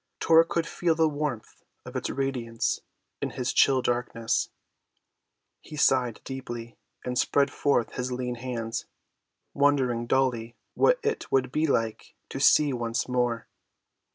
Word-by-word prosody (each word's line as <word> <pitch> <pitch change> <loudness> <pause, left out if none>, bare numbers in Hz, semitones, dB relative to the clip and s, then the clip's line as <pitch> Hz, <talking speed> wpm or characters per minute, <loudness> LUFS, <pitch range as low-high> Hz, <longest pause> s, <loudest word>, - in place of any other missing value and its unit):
Tor 165 0 +6
could 165 0 -1
feel 170 -1 0
the 160 0 +3
warmth 145 -6 -4 0.2
of - - -10
its - - -2
radiance 125 -4 -1 0.4
in - - -1
his 125 -1 -2
chill 130 -2 +4
darkness. 120 -2 0 1.1
He 155 - -10
sighed 130 -5 +2
deeply 120 -3 -7 0.3
and 125 0 -1
spread 140 -1 +2
forth 140 -5 +1
his 125 -1 -3
lean 125 0 -2
hands, 115 -2 -4 0.7
wondering 130 -5 +2
dully 120 -3 0 0.2
what - - +4
it 445 0 -2
would 130 -2 +2
be 155 +4 +1
like 115 -5 -1
to - - -5
see 145 -2 +5
once 120 -1 -2
more. 120 -2 0
125 Hz, 135 wpm, -27 LUFS, 120-140 Hz, 1.1 s, Tor